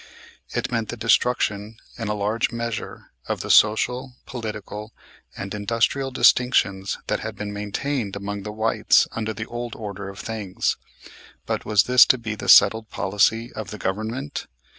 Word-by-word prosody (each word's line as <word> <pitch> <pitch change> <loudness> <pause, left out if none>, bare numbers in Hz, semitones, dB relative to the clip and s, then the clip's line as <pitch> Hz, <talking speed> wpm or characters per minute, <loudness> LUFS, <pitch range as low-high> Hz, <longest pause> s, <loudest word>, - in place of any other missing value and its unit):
It - - -3
meant 115 -3 -1
the 120 - -5
destruction 110 -2 +1 0.2
in 115 - -5
a 105 - -1
large 105 +3 0
measure 115 -1 -5 0.2
of - - -2
the - - -1
social, 125 +4 +3
political, 110 -2 -7 0.4
and 95 +1 -5
industrial 115 +6 0
distinctions 100 -7 +3
that - - -1
had - - -6
been 105 -1 -5
maintained 105 +2 -3
among 100 0 -4
the 105 +2 -6
whites 110 +1 +3
under 110 -1 -3
the 110 +1 -5
old 120 0 -6
order 100 -2 -6
of 100 - -10
things. 105 -5 -2 0.7
But - - -3
was 105 -2 +4
this 125 +2 +7
to 130 - +4
be 110 -2 -4
the 105 - -5
settled 110 +2 +6
policy 110 +5 +1
of 110 -2 -6
the 105 - -7
government? 110 +9 -4
110 Hz, 160 wpm, -23 LUFS, 105-115 Hz, 0.7 s, this